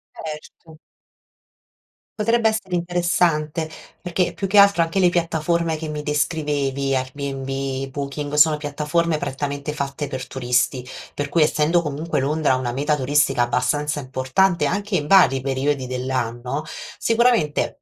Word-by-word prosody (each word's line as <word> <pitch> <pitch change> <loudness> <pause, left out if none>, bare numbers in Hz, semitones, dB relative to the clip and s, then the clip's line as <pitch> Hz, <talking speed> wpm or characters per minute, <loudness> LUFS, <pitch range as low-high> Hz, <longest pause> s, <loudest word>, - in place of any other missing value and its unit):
Erto. 155 0 -9 1.4
Potrebbe 230 +1 +3
essere 215 -4 -4
interessante 170 -3 0 0.3
perché, 175 -1 -1
più 195 - -3
che 200 +2 +1
altro, 200 -3 +7
anche 165 +3 -1
le 180 -2 +5
piattaforme 170 -1 0
che 160 0 -6
mi 150 -1 -4
descrivevi: 145 -3 -1
Airbnb, 135 0 -3
Booking, 145 +1 -5
sono 150 +1 +5
piattaforme 150 +2 -1
prettamente 140 +2 -3
fatte 140 0 -4
per 130 -2 -5
turisti, 125 0 0 0.3
per 145 0 -3
cui 165 +1 +3
essendo 155 +3 +2
comunque 150 +2 -2
Londra 145 0 +1
una 130 -2 -2
meta 145 +4 0
turistica 145 -2 +2
abbastanza 145 +5 0
importante 135 +6 +1
anche 200 +6 -1
in 150 - 0
vari 150 -7 +5
periodi 135 +1 -1
dell'anno, 125 +1 -3 0.3
sicuramente 230 -10 +1
150 Hz, 130 wpm, -22 LUFS, 135-170 Hz, 1.4 s, altro